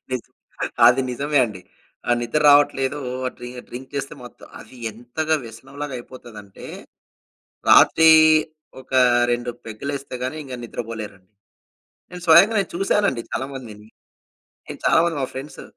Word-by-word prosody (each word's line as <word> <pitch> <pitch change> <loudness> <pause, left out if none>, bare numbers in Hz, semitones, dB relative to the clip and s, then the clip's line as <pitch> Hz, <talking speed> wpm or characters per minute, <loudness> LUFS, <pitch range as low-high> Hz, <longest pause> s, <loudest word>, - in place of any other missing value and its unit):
నిజమే. 125 - -6 0.2
అది 125 +2 +5
నిజమే 145 +4 -1
అండి. 105 -6 -8 0.5
ఆహ్, 120 - +3
నిద్ర 120 +6 -1
రావట్లేదూ 145 -1 +3 0.3
ఆహ్, - - -2
డ్రి 120 0 -8 0.2
డ్రింక్ 130 +3 -10
చేస్తే 140 +1 -4
మొత్తం 120 - -14
అది 130 - -15
ఎంతగా 120 +8 -3
వ్యసనంలాగా 135 +5 -8
అయిపోతదంటే 110 -5 -12 1.0
రాత్రి 160 0 +6 0.7
ఒక, 130 - -18 0.4
2 120 0 -2 0.2
పెగ్గులేస్తే 140 +5 -6
గాని 130 +5 -3
ఇంక 130 -2 -8
నిద్రపోలేరు. 110 -4 -7 0.9
నేను 180 0 -9
స్వయంగా 175 +7 +6
నేను 195 - -1
చూసానండి 195 - 0
చాలా 130 - -2
మందిని. 110 -5 -10 0.8
నేను - - -9
చాలా - - +5
మంది 170 -2 -1
మా 130 - -1
ఫ్రెండ్సు 135 +3 -8
130 Hz, 130 wpm, -21 LUFS, 120-145 Hz, 1.0 s, రాత్రి